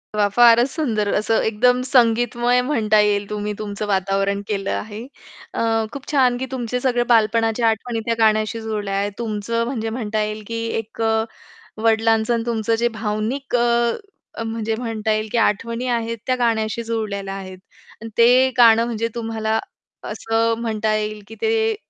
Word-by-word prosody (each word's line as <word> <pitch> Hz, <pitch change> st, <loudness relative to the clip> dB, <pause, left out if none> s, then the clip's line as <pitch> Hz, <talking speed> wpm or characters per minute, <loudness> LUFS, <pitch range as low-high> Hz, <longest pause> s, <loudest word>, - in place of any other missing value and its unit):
वाह! 205 Hz, -1 st, +3 dB
फारच 240 Hz, +1 st, +6 dB
सुंदर 225 Hz, -10 st, -1 dB
असं 220 Hz, +2 st, +1 dB
एकदम 245 Hz, +3 st, +2 dB
संगीतमय 240 Hz, 0 st, +3 dB
म्हणता 220 Hz, -6 st, +2 dB
येईल 205 Hz, -1 st, +1 dB
तुम्ही 210 Hz, 0 st, -3 dB
तुमचं 210 Hz, 0 st, -4 dB
वातावरण 195 Hz, 0 st, 0 dB
केलं 200 Hz, -2 st, -2 dB
आहे. 215 Hz, +1 st, -5 dB, 0.5 s
अ, -, -, -2 dB, 0.3 s
खूप 280 Hz, -2 st, -9 dB
छान 255 Hz, -4 st, +3 dB
की 260 Hz, -, -3 dB
तुमचे 250 Hz, -1 st, -2 dB
सगळे 245 Hz, -2 st, +1 dB
बालपणाच्या 225 Hz, +1 st, +3 dB
आठवणी 225 Hz, +1 st, -2 dB
त्या 230 Hz, -1 st, 0 dB
गाण्याशी 215 Hz, 0 st, +2 dB
जुळल्या 210 Hz, -3 st, -3 dB
आहेत. 200 Hz, +1 st, -1 dB
तुमचं 230 Hz, +1 st, -2 dB
म्हणजे 230 Hz, -3 st, -3 dB
म्हणता 220 Hz, -2 st, -2 dB
येईल 215 Hz, 0 st, -5 dB
की 230 Hz, 0 st, -4 dB, 0.2 s
एक 225 Hz, +1 st, -11 dB
अ, 220 Hz, 0 st, +2 dB, 0.6 s
वडिलांचं 225 Hz, 0 st, +2 dB
आणि 230 Hz, -1 st, -1 dB
तुमचं 225 Hz, -1 st, 0 dB
जे 235 Hz, +1 st, +1 dB
भावनिक 220 Hz, +5 st, -2 dB
अ, 235 Hz, 0 st, +2 dB, 0.4 s
अ, -, -, -4 dB
म्हणजे 225 Hz, -1 st, -2 dB
म्हणता 220 Hz, -2 st, -2 dB
येईल 215 Hz, 0 st, -2 dB
की -, -, 0 dB
आठवणी 230 Hz, +3 st, 0 dB
आहेत 230 Hz, 0 st, -4 dB
त्या 255 Hz, -, +2 dB
गाण्याशी 230 Hz, -1 st, 0 dB
जुळलेल्या 210 Hz, -4 st, -3 dB
आहेत. 185 Hz, -1 st, -8 dB, 0.4 s
आणि 225 Hz, -, -7 dB
ते 250 Hz, +3 st, +6 dB
गाणं 230 Hz, -1 st, +6 dB
म्हणजे 230 Hz, -1 st, -2 dB
तुम्हाला 225 Hz, -1 st, -1 dB, 0.4 s
असं 225 Hz, +1 st, 0 dB
म्हणता 220 Hz, -2 st, -1 dB
येईल 215 Hz, -1 st, -3 dB
की 225 Hz, -, -11 dB
ते 445 Hz, 0 st, +1 dB
225 Hz, 160 wpm, -21 LUFS, 215-235 Hz, 0.6 s, फारच